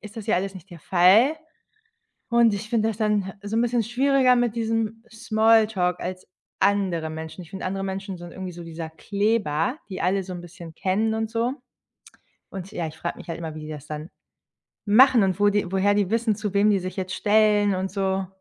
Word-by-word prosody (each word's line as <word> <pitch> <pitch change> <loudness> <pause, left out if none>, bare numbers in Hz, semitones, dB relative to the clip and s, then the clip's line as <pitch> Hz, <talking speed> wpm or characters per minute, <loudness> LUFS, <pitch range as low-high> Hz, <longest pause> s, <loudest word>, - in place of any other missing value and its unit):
ist 210 +1 -12
das 220 -2 -7
ja 215 - +2
alles 195 +1 -2
nicht 185 +1 -12
der 170 -3 -11
Fall. 195 - +5 0.9
Und 235 -3 +4
ich 215 +2 -5
finde 225 -2 +2
das 220 - -3
dann 210 -1 +2
he 190 - -6
so 205 +2 -3
'n 230 - +3
bisschen 240 0 +1
schwieriger 255 +2 +3
mit 240 -2 0
diesem 225 -1 -1
Smalltalk 220 -5 +2
als 185 0 -6 0.3
andere 190 -5 +1
Menschen. 160 +3 -7
Ich 165 - -15
finde, 190 - -7
andere 195 +1 -3
Menschen 195 -1 -5
sind 175 0 -10
irgendwie 185 -1 -6
so 170 0 -9
dieser 165 -1 -7
Kleber, 200 - -1
die 190 - -6
alle 195 +2 +1
so 185 0 -8
'n 175 - -6
bisschen 170 -2 -11
kennen 215 +5 0
und 220 0 -2
so. 235 +2 0 1.0
Und 190 0 -7
ja, 175 -6 -3
ich 155 - -9
frage 170 - -4
mich - - -12
halt 165 - -4
immer, 160 -2 -6
wie 155 - -7
die 155 - -8
das 150 -3 -8
dann 155 +2 -7 0.8
machen 245 +2 +6
und 190 0 0
wo 205 - +5
die 205 -3 0
woher 195 +1 +3
die 205 -2 +1
wissen, 230 -1 +1
zu 210 -2 -4
wem 205 +1 +4
die 200 - +3
sich 185 0 -6
jetzt 185 -1 -3
stellen 210 -1 +3
und 190 +1 -2
so. 190 -1 -1
200 Hz, 215 wpm, -24 LUFS, 180-220 Hz, 1.0 s, machen